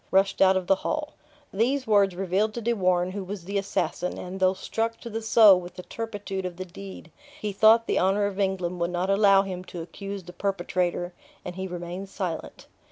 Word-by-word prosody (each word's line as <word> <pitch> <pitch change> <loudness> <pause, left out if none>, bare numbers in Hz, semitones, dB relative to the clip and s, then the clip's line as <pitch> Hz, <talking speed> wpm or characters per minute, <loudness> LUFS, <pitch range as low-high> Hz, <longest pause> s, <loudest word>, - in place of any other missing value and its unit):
rushed 195 +1 +2
out 190 0 +6
of 185 - -2
the 195 +1 +3
hall. - - -3 0.4
These 255 +6 +1
words 200 -4 +3
revealed 195 +3 0
to 235 - -3
De 235 +2 +1
Warenne 185 -3 +1
who 200 0 -4
was 190 -2 -7
the 200 +2 -1
assassin; 190 -2 -2
and 180 +1 -6
though 185 0 +3
struck 225 +4 -2
to 235 - -7
the 225 +1 -3
soul 220 -4 +7
with 175 0 -10
the 180 - -8
turpitude 205 -4 -5
of 180 -1 -5
the 185 - -5
deed, 190 -2 -10 0.3
he 210 - -2
thought 220 +3 +6
the - - +1
honor 195 +2 +2
of 200 0 -3
England 185 -2 -1
would 170 0 0
not 180 +2 -1
allow 195 -1 +5
him 185 -2 -5
to 175 -2 -7
accuse 195 +3 -7
the 175 +1 -11
perpetrator, 180 -2 -1 0.3
and 180 - -6
he 190 0 -4
remained 180 +2 -6
silent. 180 -4 -5
190 Hz, 210 wpm, -26 LUFS, 180-205 Hz, 0.4 s, soul